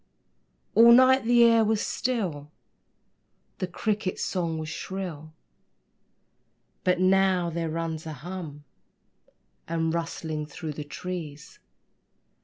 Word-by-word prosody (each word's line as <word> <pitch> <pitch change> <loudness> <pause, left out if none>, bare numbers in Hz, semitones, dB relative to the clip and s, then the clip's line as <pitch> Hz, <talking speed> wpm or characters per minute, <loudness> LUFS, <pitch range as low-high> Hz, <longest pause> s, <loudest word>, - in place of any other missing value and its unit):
All 235 +1 +8
night 260 0 +6
the 240 0 +5
air 230 -1 +5
was 220 0 +1
still, 185 - -2 1.1
The 185 - -2
crickets' 205 +1 -2
song 170 -3 -2
was 155 0 -5
shrill; 165 -2 -6 1.5
But 180 -1 +2
now 185 -2 +3
there 165 0 -2
runs 160 0 -4
a 155 - -5
hum 150 -1 -8 1.0
And 165 -1 -1
rustling 160 -2 -3
through 155 +1 -6
the 150 - -6
trees. 150 0 -7
170 Hz, 105 wpm, -26 LUFS, 155-195 Hz, 1.5 s, All